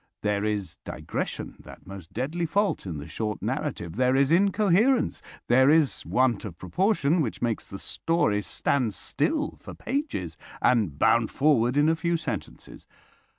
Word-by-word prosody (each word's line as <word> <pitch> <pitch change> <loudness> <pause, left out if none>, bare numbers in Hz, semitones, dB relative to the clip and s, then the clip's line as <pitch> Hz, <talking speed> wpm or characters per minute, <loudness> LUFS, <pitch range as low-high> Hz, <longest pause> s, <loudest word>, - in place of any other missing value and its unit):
There 105 -1 0
is 105 -5 -2
digression, - - -5
that - - -14
most 95 -3 -10
deadly 155 +8 -2
fault 200 - 0
in 85 -4 -4
the 75 - -7
short 105 +4 -4
narrative; 85 +3 -3
there 130 +1 +3
is 135 +2 +3
incoherence, 200 +6 +3 0.3
there 130 +3 +5
is 155 -2 +3
want 125 -4 +2
of 90 -6 -7
proportion 175 - +1
which 120 -7 -3
makes 115 -2 -2
the 100 - -7
story 105 - 0
stand 115 0 -1
still 310 -1 -1
for - - -10
pages 255 - -3 0.2
and 105 - +2
bound 115 +7 +3
forward 135 -3 +2
in 145 +1 +4
a 160 - +3
few 170 +1 0
sentences. 160 - -7
130 Hz, 150 wpm, -26 LUFS, 105-170 Hz, 0.3 s, there